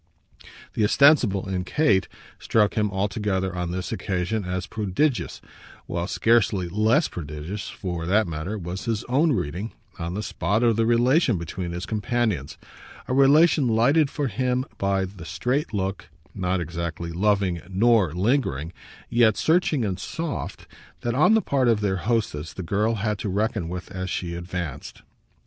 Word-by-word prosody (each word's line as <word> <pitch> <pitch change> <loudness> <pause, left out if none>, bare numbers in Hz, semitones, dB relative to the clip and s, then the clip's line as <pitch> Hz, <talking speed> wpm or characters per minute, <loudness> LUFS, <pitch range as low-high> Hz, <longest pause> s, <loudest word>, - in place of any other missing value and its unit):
The 110 - 0
ostensible, 115 -5 +4
in 95 -1 -2
Kate, 105 -4 +2 0.3
struck 105 -3 +2
him 105 -2 +1
altogether, 95 -2 -1
on 90 -1 -2
this 90 +1 -4
occasion, 100 +3 -2
as 90 0 -3
prodigious; 115 +6 -1 0.4
while 85 0 -3
scarcely 105 -5 +2
less 110 - +2
prodigious, 80 +5 -6
for 85 -3 -5
that 105 +4 +3
matter, 85 +5 -4
was 90 0 -5
his 115 -1 -1
own 150 +6 +2
reading, 95 - -3 0.3
on 85 +1 -3
the 105 - -3
spot, 100 +4 0
of 115 -2 +4
the 115 +1 +1
relation 120 - +3
between 85 +2 -5
his 90 +1 -4
companions 110 - -1 0.5
a - - -1
relation 140 +2 +5
lighted 135 +7 +3
for 145 -1 -2
him 130 0 0
by 100 -1 +1
the 95 -2 -10
straight 130 - -1
look, 95 -2 -3 0.2
not 95 -1 -1
exactly 85 0 -4
loving 95 -1 +1
nor 105 -2 +3
lingering, 90 - 0 0.3
yet 115 -3 +3
searching 160 -6 +2
and 95 -2 -2
soft, 160 +9 -5 0.4
that, 120 - -1
on 155 - +5
the 220 - +2
part 135 -3 +1
of 115 -3 +3
their 100 -2 0
hostess, 100 -7 -1
the 95 - -6
girl 105 +6 +1
had 105 -1 -2
to 105 - -3
reckon 100 -3 -1
with 90 +1 -6
as 95 -1 -4
she 85 -2 -3
advanced. 85 -4 -6
100 Hz, 155 wpm, -24 LUFS, 90-120 Hz, 0.5 s, relation